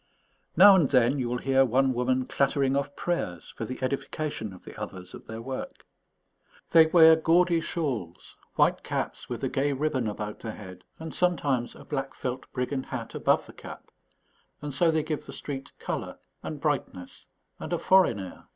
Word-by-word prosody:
Now 200 +3 +10
and 165 -7 +3
then 130 +1 +3
you 120 -2 -1
will 125 - -1
hear 135 +1 +3
one 130 +1 +2
woman 125 +1 0
clattering 135 0 +1
off 140 0 -2
prayers 90 - -3
for 115 - -4
the 130 +3 -6
edification 140 -3 -3
of 90 - -14
the - - -10
others 90 -1 -8
at - - -11
their 110 +1 -7
work. 130 +1 -6 0.9
They 165 -1 +7
wear 160 -1 +7
gaudy 170 +1 +3
shawls, 130 - -4 0.2
white - - +3
caps - - -4
with - - -5
a - - +2
gay 140 +1 0
ribbon 135 -4 -1
about 105 0 -5
the 110 -2 -6
head, 95 -4 -11
and 160 -1 -7
sometimes 145 -9 0
a - - -13
black 135 -2 -4
felt 125 0 -5
brigand 130 +1 -3
hat 120 -3 -6
above - - +1
the - - -13
cap; - - -11 0.7
and 145 -1 -6
so 165 +5 +3
they 160 -1 +1
give 155 -1 -4
the - - -8
street 135 -2 -6
colour - - -5 0.2
and 155 - -6
brightness 140 - -3 0.3
and - - -7
a - - +1
foreign 185 - +4
air. 95 -2 -9
135 Hz, 180 wpm, -27 LUFS, 120-155 Hz, 0.9 s, Now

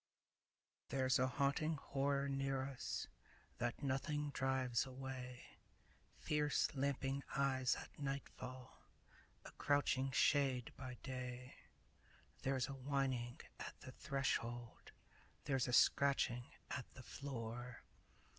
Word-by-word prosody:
THERE'S 130 -1 +3
a 130 - +4
haunting 140 +4 +2
horror 140 0 +1
near 135 -1 0
us 135 -1 -3 0.5
That 120 +3 -1
nothing 145 +2 0
drives 130 -3 +2
away; 130 -1 -7 0.6
Fierce 150 -1 +2
lamping 135 0 0 0.2
eyes 130 -2 +3
at - - -9
nightfall, 130 -2 -5 0.6
A - - -8
crouching 140 -2 +3
shade 130 -2 +3
by 130 -1 -6
day; 125 -1 -4 0.9
There's 135 -2 +1
a 140 - -4
whining 130 -3 -1 0.2
at - - -6
the 130 - -7
threshold, 120 -4 -2 0.5
There's 135 -3 +2
a - - 0
scratching 125 -2 +5 0.3
at 130 - -3
the 130 - -9
floor. 120 -3 -5
130 Hz, 105 wpm, -41 LUFS, 125-140 Hz, 0.9 s, scratching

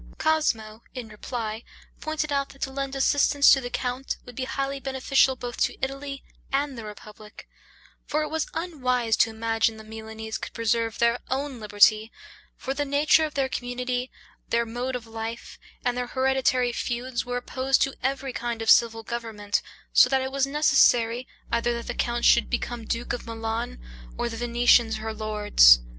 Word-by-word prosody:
Cosmo, 230 -9 0
in 245 -3 -6
reply, 220 +1 -5 0.4
pointed 310 -1 -2
out, 280 -1 0
that 275 - -8
to 265 - -2
lend 275 0 -4
assistance 285 +1 +5
to 270 - +2
the 245 - -5
count 250 +2 -3
would 245 - -10
be 255 - -3
highly 275 +1 -3
beneficial 265 0 +2
both 245 -1 -6
to - - 0
Italy 275 +1 -4 0.3
and 280 0 0
the 230 - -7
republic; 210 0 -11 0.6
for 305 +1 0
it 305 - -4
was 320 0 -1
unwise 255 -9 0
to - - +4
imagine 225 0 0
the 220 - -10
Milanese 220 0 -7
could - - -7
preserve 230 0 0
their 235 +1 +2
own 270 -1 -2
liberty; 215 +1 +4 0.5
for 270 - -3
the 290 +1 -1
nature 295 +3 +3
of 305 - -7
their 270 -1 +1
community, 250 0 -3 0.4
their 235 0 +2
mode 245 +3 -3
of 240 -2 -5
life, 225 +1 -7 0.3
and 245 0 +1
their 250 0 -2
hereditary 260 -1 +1
feuds 240 +1 -2
were 245 0 -3
opposed 260 +2 0
to 270 - -1
every 270 0 -2
kind 235 -1 -3
of 225 - +5
civil 225 -1 +4
government, 220 -3 -3 0.3
so - - +7
that 265 0 +2
it 265 - -4
was 275 0 +1
necessary, 255 -5 +3 0.2
either 235 +1 +1
that 235 - -5
the - - -4
count 240 0 -1
should - - +5
become 240 -2 -3
duke 235 +2 -2
of 240 - -5
Milan, 225 - -4 0.4
or 240 - -1
the 225 - -6
Venetians 240 -1 +3
her 220 0 -4
lords. 210 - +5
245 Hz, 175 wpm, -26 LUFS, 225-270 Hz, 0.6 s, so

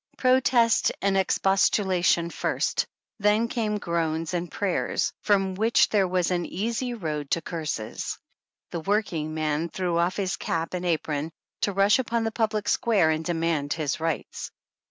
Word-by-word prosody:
Protest 255 -3 +3
and 195 -1 +2
expostulation 190 -2 +2
first, - - -1 0.3
then 210 +3 +3
came 220 -3 -1
groans 165 -2 -2
and 175 -1 -2
prayers, 200 -3 -1
from 195 -2 +2
which 220 +5 +3
there 200 -3 +3
was 180 0 0
an 175 -1 0
easy 235 +7 -2
road 150 -8 -4
to 165 - +1
curses. 155 -10 -4 0.5
The 170 - -3
working 165 -5 -1
man 155 +1 -1
threw 175 -1 -1
off 175 +2 +1
his 195 -2 -1
cap 165 0 -2
and 180 0 -2
apron 155 -2 -1 0.3
to 205 - +2
rush 200 +4 +4
upon 235 -2 0
the 225 - -1
public 215 -2 -1
square, 200 -9 +3
and 155 0 -1
demand 165 -4 0
his 155 -3 -2
rights. 160 -2 -3
180 Hz, 150 wpm, -26 LUFS, 165-210 Hz, 0.5 s, rush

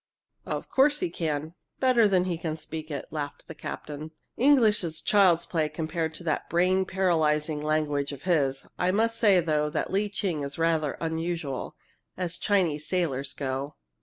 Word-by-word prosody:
"Of - - -3
course 285 +2 +4
he 360 - -1
can, 155 -1 -2 0.3
better 250 -4 +5
than 185 -3 +3
he 180 -2 -1
can 160 -1 -3
speak 155 0 -6
it!" 145 -3 -4
laughed 145 -2 -5
the - - -7
captain. 150 0 -7 0.3
"English 240 -7 +4
is 160 -2 -3
child's 185 -5 +4
play 155 -3 0
compared 160 +1 -3
to 175 - -9
that 155 -3 -1
brain 185 +3 +3
paralyzing 155 -5 +1
language 150 -2 0
of 140 -1 -9
his! 140 -7 +1
I 180 - +2
must 225 +4 +1
say, 200 -5 +5
though, 150 -2 +1
that - - -2
Lee 205 +2 +1
Ching 185 -6 -2
is 140 0 -5
rather 165 -3 +1
unusual 160 -4 -3 0.4
as 180 -1 -4
Chinese 170 -7 +1
sailors 140 -7 -1
go. 135 +2 -3
160 Hz, 165 wpm, -27 LUFS, 150-185 Hz, 0.4 s, better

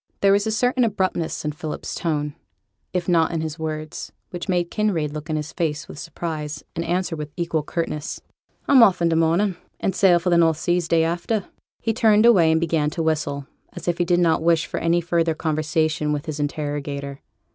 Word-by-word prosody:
There 195 - +5
was 200 +2 +3
a - - 0
certain 245 +3 +2
abruptness 190 -8 -1
in 150 - 0
Philip's 155 +1 -6
tone, 150 -3 -2 0.6
if 180 -2 -2
not 165 -3 +3
in 165 -2 -1
his 160 0 -5
words, 155 0 -5 0.2
which 175 +1 -6
made 175 -2 0
Kinraid 175 -9 0
look 155 +1 -7
in 155 - 0
his 150 0 -4
face 155 -3 -2
with - - -9
surprise, 155 -3 -5
and 170 - -2
answer 175 0 -1
with 150 -1 -5
equal 170 -2 0
curtness. 150 -1 -3 0.5
'I'm 275 -3 +7
off 190 -5 +6
i' - - +4
th' 165 - +1
morning; 170 +4 +2 0.2
and 190 - -1
sail 185 -3 +5
for 180 +1 -1
the 170 - +5
north 165 -2 +4
seas 175 0 0
day 165 -1 +3
after.' 175 +5 -1 0.4
He 225 - +1
turned 220 -2 +4
away, 185 -9 +6
and 160 - +3
began 160 -2 +1
to 165 +2 -3
whistle, 150 -3 -1 0.3
as - - -9
if 175 0 0
he - - +4
did 175 0 +3
not 165 -3 +3
wish 165 0 +3
for - - -4
any 170 +1 +2
further 170 -1 +1
conversation 155 -1 0
with 150 0 -2
his 155 -2 -5
interrogator. 145 -1 -3
165 Hz, 205 wpm, -23 LUFS, 155-175 Hz, 0.6 s, I'm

